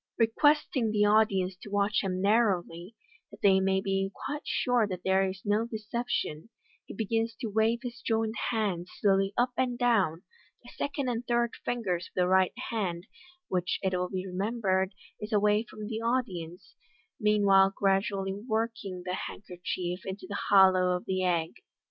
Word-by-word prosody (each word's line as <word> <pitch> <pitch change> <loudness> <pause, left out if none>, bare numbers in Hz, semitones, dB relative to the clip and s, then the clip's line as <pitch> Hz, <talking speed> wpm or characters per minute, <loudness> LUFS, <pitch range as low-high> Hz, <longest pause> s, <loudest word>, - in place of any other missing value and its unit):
Requesting 255 +1 +2
the 210 -1 +2
audience 200 -3 +3
to 205 - -11
watch 205 +1 +1
him 185 -1 -2
narrowly, 195 -3 +1 0.3
that - - -15
they 195 -1 +6
may 190 0 +1
be 195 0 -1 0.2
quite 295 +1 -3
sure 245 -3 +2
that 185 -3 -6
there 190 0 +2
is 185 0 -8
no 210 +3 +1
de 225 - -4
ception, 215 -6 -3 0.4
he - - -8
begins 225 +2 -1
to 230 -5 -5
wave 220 +3 +2
his 240 -1 -7
joined 225 -1 0 0.2
hands 200 -7 -1
slowly 195 -1 +2
up 245 +1 +2
and 250 -2 0
down, 205 -9 +2 0.4
the - - -13
second 285 -1 -2
and 240 -1 -2
third 235 0 +1
fingers 185 -8 -2
of - - -27
the 180 -1 +2
right 185 0 +3 0.2
hand 185 -6 -2 0.4
(which, 180 -1 -1
it 190 -1 0
will 180 0 -1
be 185 -1 -4
remembered, 190 0 -1 0.2
is 210 +2 -6
away 210 0 +3
from 215 -1 -8
the 220 +1 -4
audience) 195 -8 -3 0.5
meanwhile 200 -3 +5
gradually 195 0 +1
working 220 -3 -3
the 180 - -2
hand 190 - -6
kerchief 180 0 -4
into 190 +1 -6
the 200 - -4
hollow 185 -2 +5
of 180 - -5
the 185 0 -1
egg. 170 -3 +1
200 Hz, 165 wpm, -29 LUFS, 185-225 Hz, 0.5 s, they